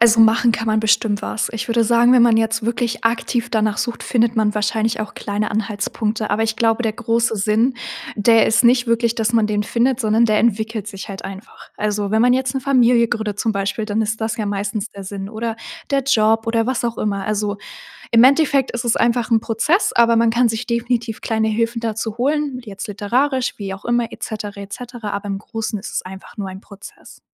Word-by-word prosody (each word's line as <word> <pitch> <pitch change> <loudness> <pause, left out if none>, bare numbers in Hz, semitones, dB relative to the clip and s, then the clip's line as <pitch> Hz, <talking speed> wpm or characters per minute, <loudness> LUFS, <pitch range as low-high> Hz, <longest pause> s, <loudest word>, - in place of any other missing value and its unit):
Also 230 -1 +6
machen 230 +1 +5
kann 225 - -3
man 215 0 +2
bestimmt 215 -1 +1
was. 220 - -2
Ich 225 0 -4
würde 230 0 +2
sagen, 235 +2 +4
wenn 245 -2 +6
man 230 -2 +5
jetzt 225 0 0
wirklich 235 0 -2
aktiv 235 +1 0
danach 215 -2 0
sucht, 240 -1 -3
findet 230 -1 +1
man 210 -1 +2
wahrscheinlich 215 +2 0
auch 215 - -5
kleine 210 +1 -3
Anhaltspunkte. 215 +1 -2
Aber 210 +2 +1
ich 225 0 -1
glaube 225 +1 +1
der 220 - 0
große 230 +1 0
Sinn, 220 +5 +1 0.4
der 225 +2 +4
ist 220 - +3
nicht 245 +1 +4
wirklich, 230 0 +1
dass 225 0 0
man 225 -2 +3
den 210 -1 0
findet, 240 +4 0
sondern 225 0 +3
der 215 -1 +2
entwickelt 220 -1 0
sich 195 -1 -8
halt 195 -1 -8
einfach. 195 +2 -10
Also 205 -1 -1
wenn 220 +1 +2
man 250 0 +4
jetzt 260 -1 -1
'ne 265 - -1
Familie 245 -3 +3
gründet 215 -3 -3
zum 225 - 0
Beispiel, 200 +2 -2
dann 215 +1 0
ist 220 +1 -3
das 220 +2 -2
ja 215 - -2
meistens 205 +2 -3
der 200 -1 -10
Sinn 195 0 -6
oder 225 0 -4 0.3
der 275 -1 +2
Job 225 -3 +2
oder 225 0 +1
was 255 -1 -1
auch 235 -1 -2
immer. 200 -2 -2
Also, 210 -1 -1 0.5
im 230 +1 +6
Endeffekt 280 -1 +3
ist 240 0 -3
es 235 - +1
einfach 235 0 +1
'n 225 -1 +4
Prozess, 300 - +1
aber 235 0 +4
man 230 0 +4
kann 235 +1 +3
sich 225 +2 -3
definitiv 235 -1 -2
kleine 220 -1 0
Hilfen 230 +2 -1
dazu 225 -1 -3
holen, 280 0 0
jetzt 200 -2 -8
literarisch, 250 +6 0
wie 195 -2 -4
auch 195 - -13
immer 240 -1 0
et - - -12
cetera, 210 -2 -5
et 200 0 -10
cetera. 240 -3 -7
Aber 200 +1 -4
im 195 -1 -3
Großen 220 0 -4
ist 200 - -8
es - - -2
einfach 190 +3 -11
nur 200 -2 -4
ein 190 +1 -9
Prozess. 200 -1 -14
225 Hz, 220 wpm, -19 LUFS, 210-235 Hz, 0.5 s, Also